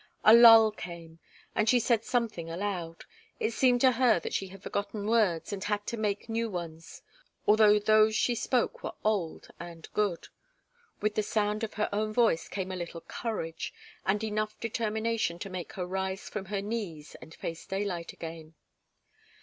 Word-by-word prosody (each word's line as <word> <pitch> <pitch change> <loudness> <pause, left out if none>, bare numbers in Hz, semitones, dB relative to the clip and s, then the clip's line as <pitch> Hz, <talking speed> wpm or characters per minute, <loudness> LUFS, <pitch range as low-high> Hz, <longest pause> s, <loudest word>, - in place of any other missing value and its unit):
A 215 - +8
lull 225 -2 +9
came, 170 -5 -9 0.3
and 215 - +2
she 250 - +5
said 230 -1 +2
something 225 -10 -1
aloud. 170 -2 -4 0.4
It 220 - 0
seemed 245 +1 +3
to 260 - +6
her 240 -5 +3
that - - -5
she 195 - -1
had 195 +1 -13
forgotten 200 +1 -3
words 210 -6 +1
and 195 -1 -4
had 205 0 -1
to - - -3
make 210 -2 -2
new 230 0 -1
ones 165 -3 -7 0.4
although 210 0 +6
those 215 +1 +4
she 245 - +2
spoke 240 +1 0
were - - -5
old 200 -7 -1
and 170 -1 -9
good. 205 -5 -1 0.7
With 210 0 +1
the 215 - +1
sound 210 +1 -1
of 225 - -4
her 210 - 0
own 215 +1 -1
voice 225 -8 +2
came 190 -1 -4
a - - -3
little 170 -1 -6
courage, 185 -8 -5 0.3
and 205 +3 0
enough 215 0 -2
determination 225 -4 -1
to 195 +2 -7
make 180 -2 -6
her 180 - -3
rise 190 +1 -3
from 210 -2 -5
her 200 0 -3
knees 200 -9 -5
and 160 - -12
face 165 0 -6
daylight 190 -4 -3
again. 160 -1 -9
205 Hz, 175 wpm, -29 LUFS, 175-220 Hz, 0.7 s, lull